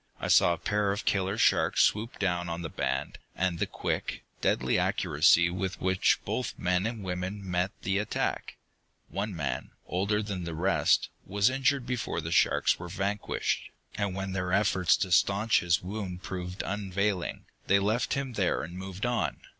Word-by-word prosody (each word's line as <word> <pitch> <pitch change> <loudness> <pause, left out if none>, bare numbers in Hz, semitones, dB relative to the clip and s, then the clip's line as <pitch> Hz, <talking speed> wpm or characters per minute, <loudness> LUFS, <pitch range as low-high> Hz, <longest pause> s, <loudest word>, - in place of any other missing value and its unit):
I - - -3
saw 85 - +6
a - - -4
pair 105 +1 0
of 100 - -3
killer 95 +1 +1
sharks - - +3
swoop 110 +3 0
down 90 -3 -1
on 85 +1 -4
the 80 - -4
band, 65 +1 -2 0.2
and 90 -2 0
the - - 0
quick, - - -3 0.2
deadly 65 +1 +2
accuracy 85 +3 +3
with 95 +1 -3
which 95 0 +3
both - - -3
men 90 +3 +1
and 115 -3 -5
woman 95 +2 -4
met 90 +1 0
the 95 +1 +1
attack. 105 - -2 0.5
One 100 0 -3
man, 75 -5 -3 0.2
older 100 +4 0
than 100 -3 -4
the 85 -1 -5
rest, 95 +5 +2
was 100 +4 +2
injured 135 0 +1
before 125 -7 -2
the 80 0 -4
sharks 75 -3 +3
were 85 0 -7
vanquished, 100 +4 -2 0.3
and 100 -3 -2
when 95 0 -3
their 90 -1 -2
efforts 95 -3 +3
to 95 - -2
staunch 100 +5 +4
his 85 -1 +1
wounds 95 -2 -5
proved 90 0 -5
unavailing, 100 -1 -2 0.2
they 100 - +5
left 105 +5 +1
him 135 -2 -3
there 100 -5 0
and 85 +2 -7
moved 95 +2 -5
on. 120 0 0
95 Hz, 170 wpm, -29 LUFS, 90-105 Hz, 0.5 s, saw